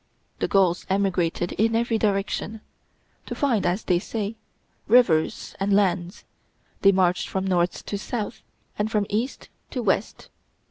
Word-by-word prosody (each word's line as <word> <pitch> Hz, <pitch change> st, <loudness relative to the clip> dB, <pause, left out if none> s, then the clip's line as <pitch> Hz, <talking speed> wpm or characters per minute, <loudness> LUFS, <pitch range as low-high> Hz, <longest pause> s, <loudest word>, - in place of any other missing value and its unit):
The -, -, 0 dB
Gauls 185 Hz, -3 st, +2 dB
emigrated 180 Hz, -3 st, 0 dB
in 225 Hz, +1 st, +3 dB
every 230 Hz, -1 st, +1 dB
direction. 210 Hz, +1 st, -1 dB, 0.7 s
To -, -, -4 dB
find, 240 Hz, -, +1 dB
as 180 Hz, +4 st, 0 dB
they 175 Hz, -1 st, +2 dB
said, 210 Hz, +2 st, -3 dB, 0.5 s
rivers 210 Hz, -10 st, +3 dB
and 195 Hz, 0 st, +2 dB
lands, 180 Hz, -3 st, 0 dB, 0.6 s
they 195 Hz, -, +7 dB
marched 185 Hz, -2 st, +2 dB
from 190 Hz, 0 st, -2 dB
north 180 Hz, -2 st, 0 dB
to 200 Hz, -, -3 dB
south, 215 Hz, 0 st, -4 dB, 0.4 s
and 210 Hz, +1 st, +1 dB
from 210 Hz, -2 st, +1 dB
east 230 Hz, +6 st, -2 dB, 0.2 s
to 250 Hz, -, -3 dB
west. 200 Hz, 0 st, -1 dB
200 Hz, 140 wpm, -24 LUFS, 180-220 Hz, 0.7 s, they